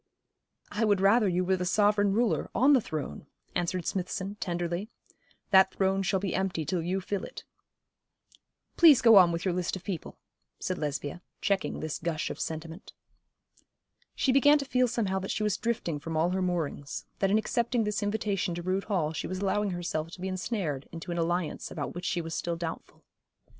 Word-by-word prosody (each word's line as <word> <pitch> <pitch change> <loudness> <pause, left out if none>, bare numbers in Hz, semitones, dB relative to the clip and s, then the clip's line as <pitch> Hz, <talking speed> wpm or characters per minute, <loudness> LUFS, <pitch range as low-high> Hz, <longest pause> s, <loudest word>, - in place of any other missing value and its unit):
'I 225 +2 +1
would 205 -2 +3
rather 205 +3 +4
you 180 0 +1
were 190 +1 +2
the 180 - -2
sovereign 205 +2 +3
ruler, 230 +3 +1
on 275 +4 +5
the 260 - +5
throne,' 150 - -5 0.3
answered 175 0 -1
Smithson, 190 +1 -3
tenderly. 175 +3 -2 0.6
'That 190 -1 +6
throne 195 0 +1
shall 195 0 +1
be 195 -1 -2
empty 180 -5 -1
till 180 0 -1
you 180 +3 -1
fill 200 +1 -3
it.' - - -8 1.3
'Please 315 -6 +8
go 225 -3 +7
on 180 -3 +7
with 170 +2 -3
your 185 - +1
list 180 +1 -1
of 185 - -8
people,' 180 -4 -5 0.4
said 185 - -3
Lesbia, 150 +2 -3 0.2
checking 200 -2 -1
this 155 -1 -3
gush 160 -2 -2
of - - -7
sentiment. 160 +3 -6 1.2
She 265 - +2
began 290 +3 +6
to 280 - -4
feel 255 -2 +2
somehow 200 -5 -1
that 190 - -6
she 215 - -1
was 210 -2 +1
drifting 215 -9 -2
from 160 +2 -4
all 165 +3 +2
her 190 +1 0
moorings, 165 -6 -2
that 195 - +2
in 205 - +4
accepting 235 +2 0
this 210 0 -1
invitation 205 -3 -1
to 175 - -5
Rood 185 +2 -1
Hall 170 -7 0
she - - -4
was 185 - -4
allowing 200 +2 0
herself 170 -3 -3
to - - -9
be 190 - -2
ensnared 185 - -3
into 165 +1 -7
an 170 - -2
alliance 175 0 -1
about - - -5
which 175 - -6
she 175 - 0
was 165 0 -6
still 170 0 -2
doubtful. 165 -1 -7
185 Hz, 190 wpm, -29 LUFS, 170-205 Hz, 1.3 s, Please